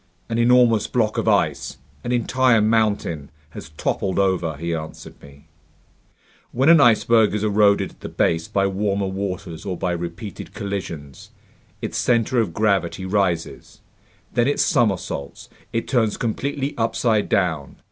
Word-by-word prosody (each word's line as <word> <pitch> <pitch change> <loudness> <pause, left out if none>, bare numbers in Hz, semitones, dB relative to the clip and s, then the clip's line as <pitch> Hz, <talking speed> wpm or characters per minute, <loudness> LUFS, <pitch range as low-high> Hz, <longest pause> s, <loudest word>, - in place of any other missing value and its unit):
"An 115 0 -1
enormous 120 -2 +4
block 110 -3 0
of - - -3
ice, - - +1 0.3
an 120 - -3
entire 125 0 +2
mountain, 105 -9 0 0.2
has - - -9
toppled 90 +4 -2
over," 90 -6 0
he 85 +2 -3
answered 80 -1 -8
me. 70 +1 -16 1.1
"When 135 +5 +2
an 165 -3 +7
iceberg 115 -3 +4
is 105 - -2
eroded 105 -1 +3
at - - -23
the - - -7
base 80 0 0
by 100 -1 0
warmer 100 0 -1
waters 95 -4 -5
or 95 -3 -4
by 90 - -1
repeated 85 +4 -6
collisions, 85 -8 -6 0.5
its - - -2
center 120 0 +2
of 105 - -2
gravity 95 -2 0
rises. 95 -4 -2 0.5
Then 120 0 +2
it 145 - 0
somersaults, 95 -10 -1 0.2
it 115 0 -2
turns 115 -5 +1
completely 140 +4 -2
upside 115 -1 +1
down. 80 -7 0
100 Hz, 140 wpm, -22 LUFS, 85-115 Hz, 1.1 s, an